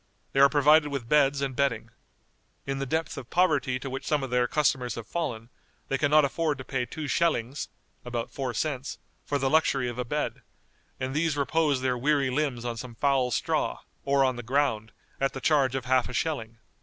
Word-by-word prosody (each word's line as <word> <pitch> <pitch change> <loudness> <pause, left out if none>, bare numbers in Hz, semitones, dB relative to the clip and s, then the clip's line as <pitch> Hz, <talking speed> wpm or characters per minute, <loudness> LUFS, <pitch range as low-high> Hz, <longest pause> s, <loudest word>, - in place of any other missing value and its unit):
They 135 - +1
are 140 0 +8
provided 150 +1 +5
with 135 -5 -4
beds 140 0 +3
and 135 -2 -2
bedding. 135 -5 0 0.7
In 135 0 -3
the 135 - -3
depth 160 +5 -2
of 125 - -11
poverty 145 -8 +2
to 135 - -7
which 135 0 -5
some 150 -2 +1
of 130 - -5
their 125 0 +2
customers 130 -3 +1
have 115 - -6
fallen, 120 -9 -4 0.4
they 135 - 0
can 145 - +2
not 150 0 +6
afford 150 +1 -1
to 130 - -7
pay 125 -2 -2
two 155 -2 -5
schellings 140 -3 0 0.3
(about 120 -1 -4
four 130 -3 -3
cents) 140 -3 -2 0.3
for 145 - -1
the 135 -1 0
luxury 135 -3 +2
of 120 0 -5
a - - 0
bed, 150 +5 -3 0.6
and 130 0 -3
these 155 0 0
repose 145 -1 +1
their 125 -1 0
weary 140 0 +2
limbs 130 -4 -1
on 120 -1 -3
some 120 0 -8
foul 135 -1 +2
straw, 115 - -1 0.2
or 140 -1 +3
on 130 -2 0
the - - -4
ground, 120 -3 0 0.3
at 135 0 0
the 135 - -5
charge 135 -3 +2
of 130 -3 -3
half 130 -1 +2
a - - -7
schelling. 115 -8 -2
135 Hz, 205 wpm, -27 LUFS, 125-145 Hz, 0.7 s, are